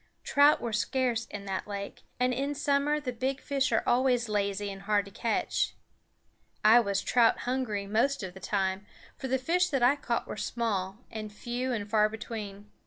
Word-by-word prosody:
Trout 290 Hz, +1 st, +5 dB
were 235 Hz, -2 st, -4 dB
scarce 235 Hz, 0 st, 0 dB
in 200 Hz, -1 st, -7 dB
that 190 Hz, -1 st, -3 dB
lake, 200 Hz, -1 st, -6 dB, 0.2 s
and 250 Hz, 0 st, +2 dB
in 280 Hz, +3 st, -2 dB
summer 290 Hz, +1 st, +1 dB
the 255 Hz, -4 st, -4 dB
big 260 Hz, +3 st, -2 dB
fish 275 Hz, -2 st, 0 dB
are 225 Hz, -, +2 dB
always 245 Hz, -1 st, +2 dB
lazy 200 Hz, -1 st, -1 dB
and 195 Hz, 0 st, -9 dB
hard 205 Hz, 0 st, +1 dB
to 200 Hz, -, -12 dB
catch. 225 Hz, +3 st, -1 dB, 0.9 s
I 225 Hz, +3 st, +8 dB
was 200 Hz, -4 st, 0 dB
trout 235 Hz, -2 st, +3 dB
hungry 245 Hz, -6 st, -2 dB
most 230 Hz, +6 st, +1 dB
of 185 Hz, -2 st, -5 dB
the 190 Hz, -, -11 dB
time, 190 Hz, 0 st, -1 dB, 0.3 s
for 265 Hz, -, -5 dB
the 265 Hz, +1 st, +1 dB
fish 355 Hz, +7 st, +1 dB
that 270 Hz, -4 st, 0 dB
I 255 Hz, +4 st, +6 dB
caught 240 Hz, -5 st, -2 dB
were -, -, -7 dB
small, 200 Hz, -5 st, -2 dB
and 215 Hz, -1 st, -6 dB
few 245 Hz, +4 st, -3 dB
and 210 Hz, -4 st, -2 dB
far 215 Hz, 0 st, +3 dB
between. 210 Hz, -2 st, -7 dB
230 Hz, 185 wpm, -29 LUFS, 205-260 Hz, 0.9 s, I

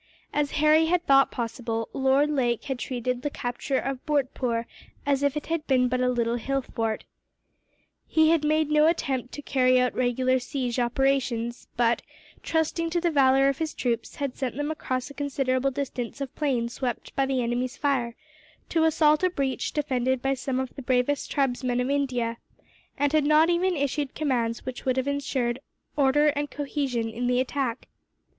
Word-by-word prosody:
As 295 Hz, -1 st, 0 dB
Harry 310 Hz, +1 st, +4 dB
had 350 Hz, +1 st, +1 dB
thought 275 Hz, 0 st, +5 dB
possible, 230 Hz, -1 st, -3 dB
Lord 270 Hz, +2 st, +3 dB
Lake 245 Hz, -5 st, 0 dB
had 265 Hz, -3 st, -4 dB
treated 250 Hz, 0 st, -2 dB
the 290 Hz, -, -1 dB
capture 265 Hz, 0 st, -3 dB
of 270 Hz, -1 st, -3 dB
Bhurtpoor 255 Hz, -5 st, 0 dB, 0.4 s
as 280 Hz, -1 st, +1 dB
if 285 Hz, +1 st, +1 dB
it 300 Hz, -, -4 dB
had 330 Hz, -2 st, -2 dB
been 255 Hz, -2 st, +3 dB
but 255 Hz, 0 st, 0 dB
a 250 Hz, -, +2 dB
little 235 Hz, -1 st, 0 dB
hill 270 Hz, +3 st, -1 dB
fort. 225 Hz, -2 st, -3 dB, 1.0 s
He 315 Hz, 0 st, +4 dB
had 330 Hz, -2 st, +2 dB
made 305 Hz, 0 st, +2 dB
no 305 Hz, +1 st, +5 dB
attempt 270 Hz, -7 st, -1 dB
to 290 Hz, -, -8 dB
carry 255 Hz, -2 st, +3 dB
out 250 Hz, 0 st, +1 dB
regular 255 Hz, +1 st, +1 dB
siege 250 Hz, -1 st, -3 dB
operations 240 Hz, -1 st, 0 dB
but, 235 Hz, 0 st, +2 dB, 0.4 s
trusting 330 Hz, +1 st, 0 dB
to 345 Hz, +1 st, 0 dB
the 345 Hz, 0 st, +1 dB
valour 270 Hz, -2 st, +4 dB
of 275 Hz, -1 st, 0 dB
his 320 Hz, -1 st, -3 dB
troops, 235 Hz, -2 st, -2 dB
had 280 Hz, -3 st, -3 dB
sent 260 Hz, -2 st, -3 dB
them 290 Hz, +1 st, -1 dB
across 255 Hz, -3 st, -3 dB
a -, -, -10 dB
considerable 275 Hz, -2 st, 0 dB
distance 260 Hz, -2 st, -4 dB
of 275 Hz, -2 st, -5 dB
plain 260 Hz, -6 st, 0 dB
swept 245 Hz, 0 st, -4 dB
by 270 Hz, -1 st, +1 dB
the 260 Hz, -2 st, 0 dB
enemy's 245 Hz, +3 st, -2 dB
fire, 255 Hz, -5 st, 0 dB, 0.5 s
to 320 Hz, -1 st, +2 dB
assault 305 Hz, -1 st, +4 dB
a 370 Hz, -, +3 dB
breach 275 Hz, -6 st, -2 dB
defended 260 Hz, -3 st, 0 dB
by 270 Hz, +2 st, 0 dB
some 260 Hz, 0 st, -2 dB
of 260 Hz, -1 st, -4 dB
the 275 Hz, -, -6 dB
bravest 260 Hz, +2 st, 0 dB
tribesmen 255 Hz, -3 st, 0 dB
of 250 Hz, +2 st, 0 dB
India; 250 Hz, -5 st, -1 dB, 0.6 s
and 290 Hz, +1 st, +1 dB
had 310 Hz, -1 st, +4 dB
not 305 Hz, +3 st, +5 dB
even 360 Hz, +1 st, +1 dB
issued 285 Hz, 0 st, -1 dB
commands 240 Hz, -6 st, -1 dB
which 255 Hz, -1 st, -6 dB
would 260 Hz, -1 st, 0 dB
have 260 Hz, +1 st, 0 dB
ensured 270 Hz, -3 st, -1 dB, 0.4 s
order 295 Hz, +1 st, +4 dB
and 290 Hz, 0 st, -2 dB
cohesion 275 Hz, -5 st, -2 dB
in 235 Hz, +2 st, -3 dB
the 250 Hz, 0 st, +2 dB
attack. 260 Hz, -2 st, -2 dB
270 Hz, 180 wpm, -26 LUFS, 250-290 Hz, 1.0 s, thought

